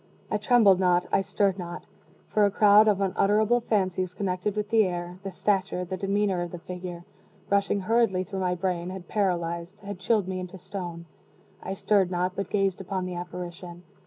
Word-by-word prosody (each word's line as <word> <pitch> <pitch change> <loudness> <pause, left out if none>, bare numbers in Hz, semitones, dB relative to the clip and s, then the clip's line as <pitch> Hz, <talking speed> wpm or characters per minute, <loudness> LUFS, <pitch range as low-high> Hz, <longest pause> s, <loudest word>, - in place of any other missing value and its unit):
I 210 - +1
trembled 210 -4 +5
not 180 -1 +3
I - - +3
stirred 195 0 0
not 175 0 -6 0.4
for 210 - +2
a 205 - +5
crowd 210 +1 +6
of 200 -2 +3
unutterable 210 +4 +2
fancies 185 -5 -1
connected 190 +1 -2
with 210 0 -3
the 225 -1 +5
air, 175 0 -4
the 195 - -5
stature, 190 -1 0
the 185 +2 -4
demeanor, 195 -1 0
of 175 - -3
the 175 - -7
figure, 175 0 -7 0.5
rushing 200 0 +2
hurriedly 215 -3 +2
through 190 +1 -5
my 180 -1 0
brain, 180 -1 -2
had 185 -2 -8
paralyzed 175 -2 -1
had 200 -2 -7
chilled 200 0 +1
me 185 -1 -3
into 185 +1 -7
stone. 175 -2 -7 0.6
I 190 - -4
stirred 195 -2 +2
not 180 0 -1
but 200 - -3
gazed 195 -2 0
upon 190 -1 -3
the 185 - -4
apparition. 175 0 -7
185 Hz, 185 wpm, -27 LUFS, 180-200 Hz, 0.6 s, crowd